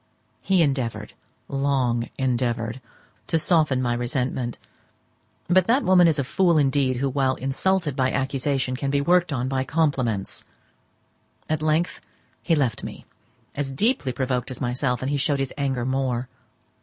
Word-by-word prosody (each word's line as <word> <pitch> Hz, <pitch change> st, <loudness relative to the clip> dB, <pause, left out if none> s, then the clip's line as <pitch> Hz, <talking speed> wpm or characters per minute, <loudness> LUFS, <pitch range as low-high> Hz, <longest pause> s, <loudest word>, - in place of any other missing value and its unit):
He 190 Hz, -3 st, +3 dB
endeavoured, 135 Hz, -6 st, -2 dB, 0.3 s
long 135 Hz, -4 st, 0 dB
endeavoured, 120 Hz, -2 st, -1 dB, 0.5 s
to 165 Hz, -, +1 dB
soften 155 Hz, -5 st, +2 dB
my 120 Hz, -1 st, +1 dB
resentment; 120 Hz, 0 st, -2 dB, 0.9 s
but 185 Hz, 0 st, +4 dB
that 255 Hz, +5 st, +3 dB
woman 180 Hz, -2 st, +5 dB
is 160 Hz, -2 st, +2 dB
a 140 Hz, -, +1 dB
fool 170 Hz, +5 st, +2 dB
indeed 135 Hz, -2 st, +2 dB
who, 135 Hz, +2 st, 0 dB
while 135 Hz, -1 st, +1 dB
insulted 150 Hz, +4 st, 0 dB
by 130 Hz, -2 st, +1 dB
accusation, 135 Hz, -1 st, -1 dB
can 135 Hz, +1 st, -2 dB
be 140 Hz, 0 st, +1 dB
worked 175 Hz, +3 st, +3 dB
on 130 Hz, -2 st, -1 dB
by 130 Hz, 0 st, 0 dB
compliments. 130 Hz, -9 st, -1 dB, 1.0 s
At 155 Hz, -1 st, -1 dB
length 155 Hz, +3 st, 0 dB, 0.4 s
he 165 Hz, -, +2 dB
left 135 Hz, -7 st, 0 dB
me, -, -, -8 dB, 0.5 s
as 140 Hz, -1 st, -3 dB
deeply 145 Hz, -, +1 dB
provoked 125 Hz, 0 st, -2 dB
as 130 Hz, -, -6 dB
myself; 125 Hz, -1 st, -1 dB
and 135 Hz, -, -1 dB
he 145 Hz, -, +1 dB
showed 145 Hz, 0 st, +1 dB
his 135 Hz, -1 st, -3 dB
anger 135 Hz, -4 st, -1 dB
more. 130 Hz, -2 st, -1 dB
135 Hz, 150 wpm, -24 LUFS, 125-155 Hz, 1.0 s, woman